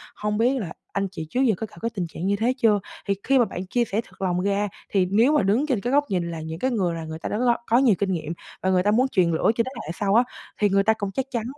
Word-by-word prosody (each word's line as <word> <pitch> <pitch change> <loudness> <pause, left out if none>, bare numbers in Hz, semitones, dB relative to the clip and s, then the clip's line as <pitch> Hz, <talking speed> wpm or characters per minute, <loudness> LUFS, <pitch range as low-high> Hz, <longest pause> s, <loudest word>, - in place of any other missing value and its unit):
hông 210 0 -2
biết 250 +4 +2
là 170 -6 -5 0.2
anh 195 0 0
chị 160 -5 -6
trước 255 - 0
giờ 235 -6 +3
có 220 - -4
gặp - - -17
cái 230 - 0
tình 185 -6 -3
trạng 165 +2 -6
như 200 - +2
thế 230 +5 +1
chưa?" 215 -4 +3 0.3
Thì 200 - +1
khi 270 0 +3
mà 240 - +5
bạn 185 -3 -6
chia 240 +5 +1
sẻ 215 0 -1
thật - - -19
lòng 180 -1 0
ra, 200 +1 +1 0.2
thì 190 -2 +2
nếu 230 +8 +4
mà 300 - +3
đứng 215 +9 +2
trên 250 -8 0
cái 245 +4 -2
góc 290 +1 +4
nhìn 175 -3 -1
là 165 -1 -5
những 160 +1 -6
cái 260 +5 0
người 185 -8 0
là 165 -1 -5
người 160 0 -6
ta - - -4
đã - - -1
gọi 240 0 +2
có 230 - +4
nhiều 250 -6 +5
kinh 200 -1 0
nghiệm 165 -2 -3 0.3
và 190 - +1
người 185 -1 +3
ta 205 - +3
muốn 250 +5 +3
truyền 185 -9 +2
lửa 160 - +3
cho 230 - +2
thế 260 - -6 0.2
hệ - - -3
sau 200 -1 +2
á, 235 - +6 0.4
thì 205 - +3
người 195 0 +3
ta 220 +2 +4
cũng 200 -2 -3
chắc 265 +6 -2
chắn 235 -3 -1
205 Hz, 320 wpm, -24 LUFS, 185-235 Hz, 0.4 s, á